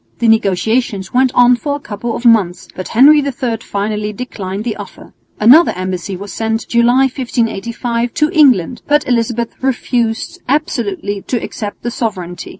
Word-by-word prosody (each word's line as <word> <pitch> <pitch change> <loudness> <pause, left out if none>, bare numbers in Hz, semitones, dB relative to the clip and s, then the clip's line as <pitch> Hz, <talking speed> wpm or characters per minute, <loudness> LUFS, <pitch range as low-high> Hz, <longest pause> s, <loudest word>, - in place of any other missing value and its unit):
The 235 - 0
negotiations 220 -1 +1
went 255 0 +3
on 245 0 +6
for 285 +4 -3
a - - -6
couple 230 -2 -5
of 240 - -7
months, 205 -7 +3
but 185 - -6
Henry 290 +6 +6
III 260 -4 -2
finally 210 0 -3
declined 205 -3 -6
the 230 -2 -3
offer. - - -11 0.3
Another 265 +11 +6
embassy 185 0 -4
was 200 +2 -8
sent, 225 0 -2
July, 240 +2 +3
1585, 235 -2 -2
to 300 0 +1
England, 255 - +3
but 295 +1 +2
Elizabeth 235 -1 -1
refused 240 -3 -1
absolutely 205 -8 -2
to 250 - 0
accept 210 -3 -6
the 240 - -2
sovereignty. 185 -7 -4
235 Hz, 150 wpm, -15 LUFS, 205-250 Hz, 0.3 s, on